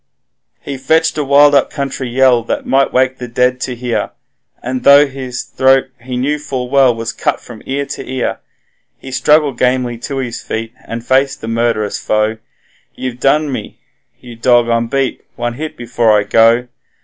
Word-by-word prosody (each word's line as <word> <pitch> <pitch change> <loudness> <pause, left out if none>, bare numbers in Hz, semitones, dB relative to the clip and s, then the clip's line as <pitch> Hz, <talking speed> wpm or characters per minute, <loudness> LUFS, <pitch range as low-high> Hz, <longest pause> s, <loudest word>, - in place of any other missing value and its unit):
He 140 - -6
fetched 160 +5 +2
a - - +1
wild 145 +1 +5
up 140 - +3
country 135 -3 -4
yell 125 -1 +3 0.2
might 135 0 +2
wake 130 0 +1
the 125 - -5
dead 125 +2 0
to 125 - -3
hear, 120 -1 -2 0.5
And 130 +1 -3
though 140 +1 +7
his 130 -3 -6
throat, 130 0 +2
he 125 +1 -5
knew 145 +4 -1
full 130 -4 -5
well, 135 -3 +4
was 115 0 -4
cut - - -1
from 115 -3 -12
ear 140 +1 -2
to 135 - -7
ear, 130 -1 -2 0.6
He 130 - -10
struggled 150 -1 +2
gamely 125 -2 0
to 135 +3 -5
his 125 -3 -4
feet, 115 +1 -5
and 115 0 -6
faced 135 +2 +1
the 115 - -6
murd'rous 115 -2 -1
foe: 110 +1 0 0.6
'You've 125 -1 -5
done 150 +3 +2
for 145 - -4
me! 130 - -6 0.4
you 120 -2 -11
dog, 120 0 +3
I'm 115 0 +1
beat! 135 +1 -2
one 120 0 -3
hit 155 +5 -6
before 115 -2 +2
I - - 0
go! 115 +4 +3
125 Hz, 180 wpm, -15 LUFS, 120-135 Hz, 0.6 s, though